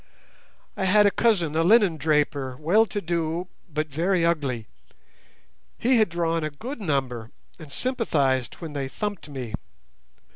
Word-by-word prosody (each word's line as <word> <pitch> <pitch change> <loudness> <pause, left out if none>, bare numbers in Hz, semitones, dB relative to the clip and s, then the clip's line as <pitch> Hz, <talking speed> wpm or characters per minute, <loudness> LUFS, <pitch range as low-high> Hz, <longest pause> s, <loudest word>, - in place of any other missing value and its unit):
I 190 - -1
had 205 +2 +5
a 205 - +5
cousin 185 -11 +2
a 165 - +3
linen 200 -3 +5
draper, 145 -4 0
well 200 +9 +4
to 205 - -3
do, 170 +1 -2 0.2
but 155 +1 -1
very 170 +4 +1
ugly. 140 -9 0 1.1
He 250 +1 +3
had 215 - +3
drawn 165 -1 0
a 155 - -1
good 230 - -7
number, 130 - -1 0.3
and 155 -4 -11
sympathized 145 - 0
when 165 -4 -8
they 140 -2 -2
thumped 205 +4 -5
me. 130 -6 -6
165 Hz, 145 wpm, -25 LUFS, 145-195 Hz, 1.1 s, had